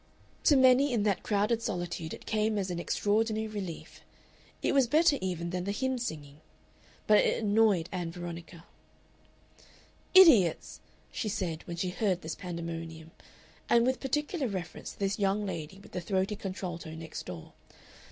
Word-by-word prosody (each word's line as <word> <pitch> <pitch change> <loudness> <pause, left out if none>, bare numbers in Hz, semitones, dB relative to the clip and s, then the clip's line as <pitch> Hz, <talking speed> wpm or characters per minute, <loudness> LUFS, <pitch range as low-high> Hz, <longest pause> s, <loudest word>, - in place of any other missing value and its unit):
To 295 - +6
many 260 +2 +5
in 220 -4 +1
that 200 -3 +1
crowded 210 +2 +1
solitude 175 -5 -3
it - - -9
came 215 0 0
as 190 -2 -2
an 175 - -3
extraordinary 220 +4 0
relief. 195 -6 -7 0.6
It - - +2
was 270 -3 +4
better 305 +1 +4
even 170 -2 -3
than 180 0 -3
the 200 - -1
hymn 260 +4 -1
singing. 150 -9 -6 0.6
But 210 -1 +6
it - - +1
annoyed 205 -5 +3
Ann 180 -3 -3
Veronica. 170 -1 -8 1.5
"Idiots!" 255 - +6 0.3
she 215 - -3
said, 175 -5 -3
when 170 - -5
she 180 +2 -1
heard 185 -2 0
this 160 - -4
pandemonium, 165 -2 -6 0.6
and 235 0 +5
with 260 0 +1
particular 295 +2 -1
reference 185 -5 -6
to - - -22
this 200 0 -1
young 200 +1 +1
lady 165 -1 -5
with 195 - -15
the 180 - -4
throaty 190 +3 -1
contralto 180 -5 -6
next 160 -1 -8
door. 85 -3 -8
195 Hz, 155 wpm, -30 LUFS, 170-220 Hz, 1.5 s, To